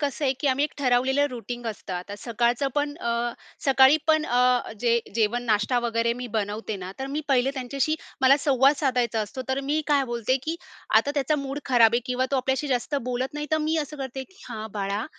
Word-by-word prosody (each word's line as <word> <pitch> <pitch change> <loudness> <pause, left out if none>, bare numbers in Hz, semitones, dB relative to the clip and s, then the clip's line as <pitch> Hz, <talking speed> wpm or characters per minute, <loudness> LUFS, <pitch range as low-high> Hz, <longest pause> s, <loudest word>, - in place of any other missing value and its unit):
कसं 285 0 -2
आहे 265 - +3
की 290 - -1
आम्ही 270 +3 +2
एक 300 - -4
ठरवलेलं 265 +2 +2
रूटीन 240 0 -6
असतं. 210 -3 -5
आता 180 +3 -5
सकाळचं 240 +3 0
पण 290 0 0
अ, 235 0 -1 0.3
सकाळी 270 +1 +6
पण 315 -1 +3
अ, 250 0 +2
जे 235 -1 +3 0.2
जेवण 230 +2 +1
नाष्टा 215 +2 +2
वगैरे 235 0 0
मी 245 +1 -6
बनवते 210 0 -2
ना, 185 0 -7
तर 265 - -3
मी 290 +3 -3
पहिले 265 0 +3
त्यांच्याशी 275 +3 -1 0.3
मला 265 +1 +6
संवाद 275 0 +4
साधायचा 245 -6 0
असतो. 255 +5 -5
तर 265 +1 0
मी 295 +3 0
काय 285 -2 +3
बोलते 240 +1 0
की 325 +3 -3 0.4
आता 285 - +3
त्याचा 290 +1 +1
मूड 275 0 -4
खराब 235 -3 +5
आहे 240 - +3
किंवा 255 +1 0
तो 275 - +2
आपल्याशी 265 +3 0
जास्त 255 +3 -1
बोलत 255 +3 -3
नाही, 295 0 -3
तर 315 - +4
मी 310 +1 0
असं 300 0 -4
करते 265 -1 -5
की 380 - -25
"हां 220 -2 -5
बाळा, 200 +1 -2
255 Hz, 210 wpm, -25 LUFS, 235-280 Hz, 0.4 s, सकाळी